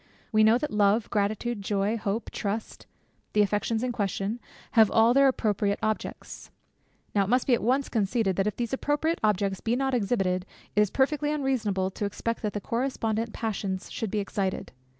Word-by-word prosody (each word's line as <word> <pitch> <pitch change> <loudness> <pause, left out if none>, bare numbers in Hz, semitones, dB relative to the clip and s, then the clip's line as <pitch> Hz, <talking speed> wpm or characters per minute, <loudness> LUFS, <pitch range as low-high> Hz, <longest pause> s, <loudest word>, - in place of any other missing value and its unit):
We 215 -1 +4
know 220 +2 +6
that 300 +3 -3
love, 210 +1 +2
gratitude, 210 +2 -1
joy, 200 +2 0
hope, 215 0 -3
trust, 215 +1 -4 0.5
(the 210 - +5
affections 210 +3 0
in 255 - 0
question) 205 0 -2 0.3
have 220 -3 +6
all 225 +2 +5
their 275 +1 +6
appropriate 205 -5 +1
objects. 215 0 -4 0.6
Now 200 -1 +3
it - - -6
must 250 +2 +3
be 260 - +3
at 235 - +2
once 260 +5 +1
conceded, 210 -2 0
that 195 +1 +1
if 210 - -1
these 235 -1 -3
appropriate 295 +4 0
objects 200 -2 +1
be 230 +1 0
not 265 +1 0
exhibited, 195 -5 0 0.3
it 210 - +5
is 210 - +3
perfectly 295 +4 +1
unreasonable 225 -10 0
to 205 - -3
expect 230 +3 -3
that 210 -2 -2
the 205 - -2
correspondent 230 -1 -1
passions 200 -4 -3
should 225 - -3
be 215 - -2
excited. 200 -2 -2
215 Hz, 180 wpm, -27 LUFS, 200-240 Hz, 0.6 s, know